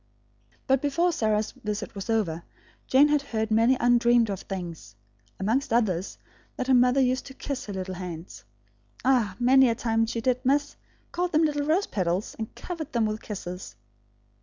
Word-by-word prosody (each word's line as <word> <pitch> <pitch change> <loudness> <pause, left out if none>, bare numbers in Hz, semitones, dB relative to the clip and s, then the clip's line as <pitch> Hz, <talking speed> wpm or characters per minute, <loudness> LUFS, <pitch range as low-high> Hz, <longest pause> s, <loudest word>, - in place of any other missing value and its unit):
But 270 0 +2
before 335 +5 +1
Sarah's 215 -6 0
visit 210 -5 -5
was 195 +2 -7
over, 190 -8 0 0.5
Jane 280 +3 +5
had 295 -1 +3
heard 220 -5 -3
many 230 +4 +4
undreamed 240 -2 +4
of 195 - -4
things; 170 - -7 0.4
amongst 225 +8 0
others, 200 -6 0 0.4
that 255 - -3
her 265 - +2
mother 250 +1 +4
used 255 0 +1
to 265 - -11
kiss 275 -4 -5
her 205 - -5
little 190 0 -4
hands, 170 - -8 0.6
"ah, 240 -8 +2
many 260 +1 +5
a 230 - 0
time 225 -1 0
she, 230 +1 -3
did, 250 +2 0
miss; 285 +2 +1 0.4
called 355 0 -2
them 310 +1 +4
little 290 -1 -1
rose 345 +6 +2
petals, 185 0 -2
and 220 - -6
covered 330 -5 -6
them 235 -2 +2
with 215 0 -3
kisses." 180 - -7
230 Hz, 170 wpm, -26 LUFS, 200-265 Hz, 0.6 s, Jane